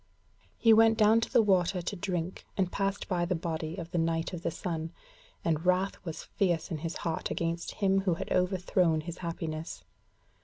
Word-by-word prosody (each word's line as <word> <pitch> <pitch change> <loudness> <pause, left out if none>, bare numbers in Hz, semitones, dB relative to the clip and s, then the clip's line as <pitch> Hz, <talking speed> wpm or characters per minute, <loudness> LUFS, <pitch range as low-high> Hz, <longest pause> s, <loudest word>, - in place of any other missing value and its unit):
He 225 -1 +6
went 225 0 +6
down 220 +1 +5
to - - -3
the 235 - +5
water 185 -2 +2
to 180 +4 -4
drink, 180 -1 -3
and 185 -2 +1
passed 195 0 -1
by 180 -3 0
the 180 +1 0
body 160 -1 -3
of 170 -2 -6
the 175 - 0
Knight 165 +1 0
of 175 - -5
the - - -1
Sun, 165 -1 -4 0.5
and 160 -1 +1
wrath 185 +2 +1
was 165 -4 -6
fierce 175 -4 -1
in 160 - -2
his 165 +2 -4
heart 165 -1 -1
against 170 0 -2
him 195 -1 +2
who 185 -3 +1
had - - -6
overthrown 180 -3 +2
his 170 +2 -7
happiness. 165 -2 -5
175 Hz, 190 wpm, -30 LUFS, 165-195 Hz, 0.5 s, He